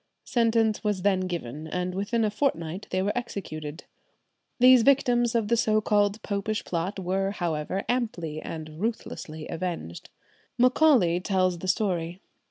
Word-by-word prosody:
Sentence 225 -2 +2
was 205 -4 -1
then 190 -2 +2
given, 155 -3 -5
and 180 +2 -2
within 215 +4 0
a 210 - 0
fortnight 195 - -2
they 185 0 0
were 205 - -1
executed. 160 -10 -5 0.8
These 255 0 +8
victims 245 -2 +3
of 225 -3 +1
the 235 - +3
so 215 -2 +2
called 205 0 +1
Popish 210 +1 -2
Plot 180 +4 -2
were, 190 +1 -1
however, 175 0 -2
amply 175 -11 -2
and 155 0 -7
ruthlessly 160 -8 -4
avenged. 165 - -5 0.5
Macaulay 250 - +4
tells 185 -2 0
the 185 - -6
story. 180 -3 0
195 Hz, 140 wpm, -26 LUFS, 170-225 Hz, 0.8 s, These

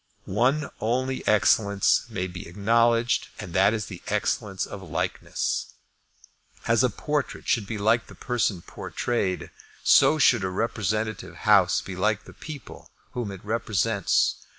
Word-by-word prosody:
One 130 +9 +1
only 130 +4 -1
excellence 100 -1 +3
may 90 - -3
be 90 -1 -7
acknowledged, 115 +5 +2
and 85 - -7
that 95 +2 +4
is 110 -2 -2
the 90 -4 -9
excellence 95 -2 -1
of 100 - -8
likeness. 85 -5 -3 0.9
As 115 +1 +3
a 125 - +4
portrait 150 +6 -3
should 110 -4 +1
be 110 - -4
like 110 +3 +2
the - - -13
person 115 -8 -1
portrayed, 100 -6 -3 0.3
so 155 - +6
should 120 -7 +4
a 95 - 0
representative 110 +1 -2
House 100 -5 +5
be 95 - -7
like 105 +3 0
the - - -14
people 145 -7 -10 0.2
whom 120 -4 -4
it 95 0 -10
represents. 110 -2 +1
110 Hz, 140 wpm, -25 LUFS, 95-120 Hz, 0.9 s, so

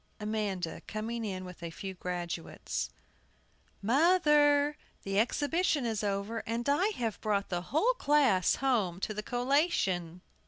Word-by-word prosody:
AMANDA 205 -6 -2
[coming 225 +2 -3
in 185 -3 -4
with 180 -1 -10
a 170 - -4
few 190 +3 -6
graduates 175 -2 -4 0.5
]. - - -37
MOTHER, 295 - +4 0.3
the 195 0 0
exhibition 290 +4 +1
is 220 -2 -1
over, 200 +3 -1
and 230 +2 -2
I 295 +8 +3
have 225 -3 -3
brought 205 -2 0
the 175 -1 -1
whole 420 - +3
class 280 - +3
home 215 -10 0
to 215 - -2
the 210 - -3
collation. 230 - 0
220 Hz, 135 wpm, -31 LUFS, 190-285 Hz, 0.5 s, MOTHER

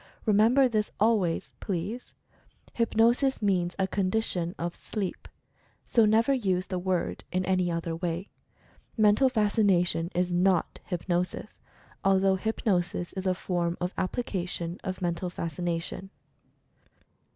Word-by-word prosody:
Remember 225 +5 +5
this, 215 -3 0
always, 205 -6 +1
please 200 +6 -4 0.3
— - - -30
HYPNOSIS 235 +4 +3
MEANS 180 -4 +1
A 190 - +2
CONDITION 185 -3 0
OF 170 0 -3
SLEEP, 200 -4 -5 0.6
so 230 -2 +3
never 225 +5 +4
use 190 -8 0
the 185 -2 -3
word 185 -1 -1
in 185 0 0
any 185 -1 +1
other 165 -1 -2
way. 170 +2 -3 0.7
Mental 215 +5 +5
Fas 215 -3 0
cination 180 -5 +3
is 180 0 +1
not 180 -1 +2
Hypnosis, 175 0 -3 0.4
although 195 0 +4
Hypnosis 185 -4 -1
is 190 0 -3
a 185 - +2
form 175 -2 -2
of 180 +1 -2
application 180 -4 -3
of 185 -1 -4
Mental 175 +1 -1
Fascination. 170 +2 -4
185 Hz, 125 wpm, -28 LUFS, 175-215 Hz, 0.7 s, Remember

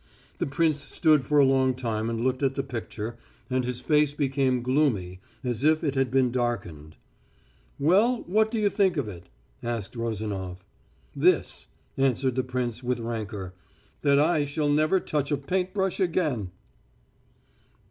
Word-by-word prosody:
The - - 0
prince 155 +1 +1
stood 150 -1 +3
for 150 - +1
a 140 - +7
long 130 -1 +3
time 115 -3 -2
and 115 0 -2
looked 130 +1 0
at 135 -1 +1
the 135 - -1
picture, 115 -3 -6 0.3
and 130 0 +1
his 125 0 -4
face 150 -1 +2
became 135 -3 +1
gloomy 120 -10 +1 0.2
as 125 -1 -2
if 155 +1 +3
it 145 -4 0
had 135 -2 +1
been 130 -1 +2
darkened. 90 - -3 0.8
"Well, 205 - +3
what 215 +4 +2
do 230 - -3
you 210 -1 +2
think 190 -4 +2
of 140 -6 -1
it?" 90 -3 -10 0.3
asked 120 -2 -4
Rozanof. 100 -5 -4 0.5
"This - - +2
" - - -38
answered 135 -1 +2
the 130 +1 0
prince, 125 -2 -3
with 125 -1 -1
rancour, 110 -5 -5 0.5
"that 140 -1 +4
I 155 +1 +3
shall 145 +1 -1
never 155 +5 +3
touch 150 -4 -2
a 145 - +2
paint 180 +7 -1
brush 190 -2 -1
again." 155 - 0
130 Hz, 160 wpm, -26 LUFS, 115-150 Hz, 0.8 s, a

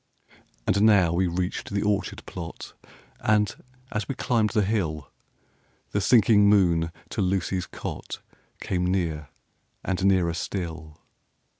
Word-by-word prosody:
And 100 - +2
now 100 -6 +5
we 90 +2 +2
reached 90 +1 -3
the 100 0 -1
orchard 105 -1 -1
plot; 85 -1 -8 0.5
And, 105 -1 +2 0.4
as 105 -2 -2
we 135 - -3
climbed 115 -4 +1
the 105 0 +2
hill, 85 -9 -2 0.8
The 100 - 0
sinking 105 -2 +5
moon 85 -5 +3 0.2
to - - -2
Lucy's 95 -1 0
cot - - -6 0.4
Came 90 -1 -1
near, 80 -5 -1 0.5
and 95 -1 -2
nearer 95 -4 +3
still. 80 -3 -5
95 Hz, 125 wpm, -26 LUFS, 85-105 Hz, 0.8 s, now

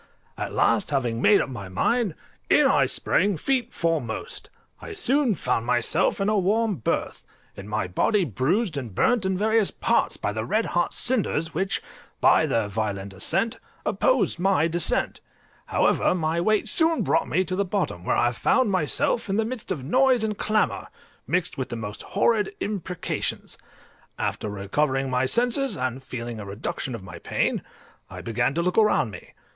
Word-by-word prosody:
At - - -4
last, - - +2
having 120 -5 -1
made 205 - +5
up - - -3
my 105 -7 -7
mind, 205 - 0 0.3
in - - +5
I - - +4
sprang 200 0 +1
feet 250 - -1
foremost; 165 - -3 0.3
I 430 - -7
soon 280 - +1
found 115 -6 -1
myself 125 - +1
in 195 - 0
a 215 -1 +2
warm 210 +1 +1
berth, 110 - -2 0.3
and 100 +1 -9
my 105 -2 -1
body 190 - +1
bruised 155 - 0
and 120 -8 -6
burnt 230 - +2
in 190 -1 0
various 220 0 +2
parts - - 0
by 100 - -2
the 110 0 -3
red 215 - 0
hot 175 0 0
cinders, 205 -10 0
which, 190 +4 -1 0.4
by - - +4
their 115 -2 0
violent 100 -2 -3
ascent, 220 - -1 0.3
opposed - - +1
my 185 -4 +3
descent: 170 0 -1 0.5
however, - - +2
my 165 -1 0
weight 215 +4 +1
soon 320 +7 +2
brought 150 +4 +1
me 185 +3 +1
to 185 - -3
the 200 - +1
bottom, 185 - -2
where - - +1
I 120 0 +3
found 205 - +2
myself 185 +5 +1
in 195 - 0
the 220 +1 +1
midst 230 -3 -5
of 150 -8 -3
noise 255 - +3
and 215 -1 -1
clamour, 215 +1 0 0.4
mixed 180 -4 -1
with 130 - -3
the 120 - -4
most 105 -2 -6
horrid 205 -1 +1
imprecations; 190 -4 -3 0.6
after 105 - -2
recovering 130 +7 -1
my 125 +1 +1
senses, 245 - +2
and 130 0 -2
feeling 120 -3 -6
a 105 - -7
reduction 110 +5 -4
of 100 - -9
my 95 - -9
pain, - - -1 0.5
I - - -8
began 120 +4 -1
to 170 - +1
look 180 +3 -1
about 210 - +4
me. 100 - -11
175 Hz, 175 wpm, -25 LUFS, -, 0.6 s, made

